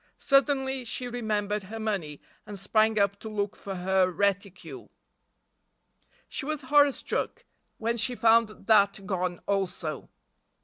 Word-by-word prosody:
Suddenly 270 -1 +2
she 245 +2 -4
remembered 210 -3 -2
her 225 +4 -7
money 190 -10 -3 0.3
and 205 - -7
sprang 215 +3 +2
up 200 0 +1
to 220 - -7
look 205 -1 -2
for 195 -1 -7
her 185 0 +2
reticule. 200 +1 -2 1.4
She - - -4
was 305 +1 -3
horror 290 +2 +5
struck - - -3 0.3
when 230 +1 -1
she 245 +2 +1
found 225 -2 +3
that 200 -2 +3
gone 180 -2 -2
also. 180 -6 -3
210 Hz, 130 wpm, -27 LUFS, 195-235 Hz, 1.4 s, horror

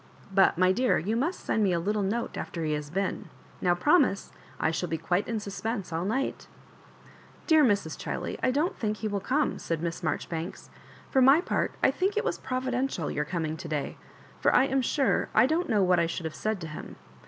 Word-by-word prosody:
But^ 190 -3 +4
my 185 +1 +4
dear, 250 +6 +2
you 205 +7 -1
must 305 +10 -1
send 220 - 0
me 190 -3 +2
a 170 - +1
tittle 205 +4 0
note 215 +5 -2
after 165 -2 -4
he 155 - 0
has 150 -1 -4
been. 190 +4 -2 0.3
Now 175 -1 +3
promise. 275 - +2 0.3
I 160 - +2
shall 175 +1 -2
be 160 - -1
quite 175 +4 0
in 225 -1 -1
suspense 200 -2 -4
all 165 +2 -1
night." 260 +7 -2 0.5
" - - -24
Dear 315 -2 +5
Mrs. 200 - +1
Chiley, - - -3
I - - +2
don't 295 +8 0
thmk 215 -1 -1
he 220 - -3
will 205 -1 -1
come," 275 +9 0
said 165 -1 -3
Miss 170 0 -3
Marjorifoanka 165 +2 -4 0.4
"For 265 - +4
my 270 +5 +7
part, 355 - -1
I - - +6
think 390 +3 -1
it 435 - +1
was - - -1
providential 255 - -2
your 150 - -1
coming 160 -1 -2
to 175 - -7
day 150 -3 -3 0.2
— - - -24
for - - +4
I - - +6
am 270 0 +1
sure 270 +2 +1
I - - +7
dont 320 +5 0
know 210 -4 +3
what 180 -1 +4
I 170 - +2
should 170 0 -4
have 160 - -3
said 215 +4 -2
to 165 - -5
him. 150 - -8
200 Hz, 220 wpm, -28 LUFS, 170-255 Hz, 0.5 s, my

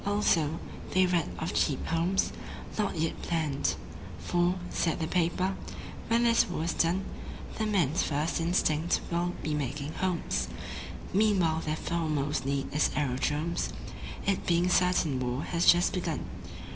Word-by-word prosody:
Also, 170 -7 +2 0.4
they 185 0 +6
read 175 -3 +1
of 160 - -3
Cheap 140 -4 +1
Homes, 170 +4 +1 0.4
not 205 -5 -1
yet 160 +1 -1
planned; 155 -5 0 0.4
For, 175 +1 +1 0.2
said 165 -1 0
the 160 - 0
paper, 180 +3 +1 0.5
"When 230 +1 +3
this 230 -4 +4
war 175 -3 -2
is 165 -1 0
done 180 +3 +1 0.5
The 220 - +1
men's 175 -7 +2
first 155 +3 0
instinct 165 -1 +2
will 175 +1 0
be 155 - -1
making 145 +1 -2
homes. 185 -3 -1 0.7
Meanwhile 190 -6 +3
their 155 0 0
foremost 155 -5 -1
need 140 0 -1
is 150 - +3
aerodromes, 145 +4 0 0.6
It 195 -1 0
being 175 +1 +3
certain 180 -7 +3
war 125 +2 -1
has 170 -1 0
just 175 +1 +2
begun. 170 -5 -2
170 Hz, 140 wpm, -29 LUFS, 150-180 Hz, 0.7 s, they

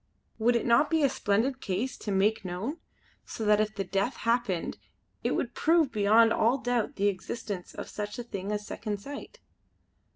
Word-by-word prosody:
Would 240 +2 +3
it 235 - +1
not 235 +5 +4
be 320 -2 +2
a 280 - +5
splendid 240 +7 0
case 210 +7 -2
to 210 - -4
make 200 +3 +2
known; 190 - -4 0.5
so 220 - -5
that 210 0 +5
if 215 0 -2
the 195 - -1
death 195 +6 -1
happened 230 -7 -1 0.4
it - - +1
would - - -2
prove 325 -3 +3
beyond 220 +1 +5
all 235 +4 +3
doubt 245 -3 -1
the 200 - 0
existence 195 -1 -4
of - - -6
such 210 0 -5
a 240 - -4
thing 200 -3 -5
as 210 0 -2
Second 210 -2 -4
Sight." 280 +7 -9
215 Hz, 185 wpm, -29 LUFS, 200-245 Hz, 0.5 s, a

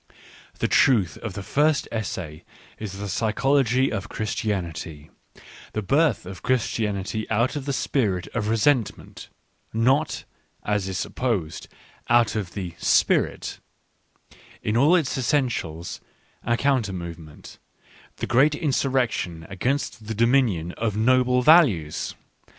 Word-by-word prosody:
The - - 0
truth 100 -11 +3
of 110 -4 -5
the 100 - -5
first 150 +6 +1
essayls 90 -8 -4 0.4
the~psych61ogy 115 +6 +1
of 100 -3 -4
Chris 110 +1 -3
tianity: 85 -8 -4 0.6
the 110 - -2
birth 150 - +2
of 90 -1 -9
Christianity 110 -4 -1
out 120 +6 +1
of 145 -2 -4
the 140 - -1
spirit 105 -10 0
of 105 -3 -2
resentment, 115 +2 0 0.4
not, 130 +7 +1 0.4
as 105 -2 -1
is 95 -1 -3
supposed, 100 -8 -2 0.4
out 120 -2 +4
of 100 -5 -4
the 90 -4 -4
" - - -28 0.2
Spirit," - - 0 0.5
— - - -25
in 105 - 0
all 145 +9 +5
its 155 -6 0
essentials, 115 - -1 0.4
a 120 0 0
counter 130 -8 +1
movement, 85 -4 -9 0.6
the - - -4
great 140 +5 +3
insurrection 130 - -1
against 115 +2 -2
the 110 - -3
dominion 115 -8 +2
of 110 -2 -1
noble 125 +2 +3
values. 125 - +4
110 Hz, 120 wpm, -24 LUFS, 95-130 Hz, 0.6 s, all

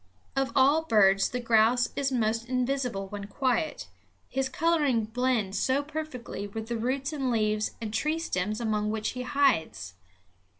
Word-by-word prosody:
Of 270 0 0
all 285 +4 +4
birds 195 -6 +4
the 250 - -3
grouse 235 +1 +3
is 275 -1 0
most 230 -1 0
invisible 250 -5 -1
when 200 0 -6
quiet, 220 - -1 0.4
his 265 0 -1
coloring 295 -6 +1
blends 225 -4 0
so 270 +2 +1
perfectly 290 -9 -6
with 220 +2 -7
the 235 - -1
roots 270 +5 -1
and 270 -4 -1
leaves 215 -2 0
and 220 -2 -5
tree 305 +7 0
stems 215 - -2
among 215 -2 0
which 215 0 -1
he 250 - -5
hides. 215 - +1
240 Hz, 155 wpm, -28 LUFS, 215-270 Hz, 0.4 s, all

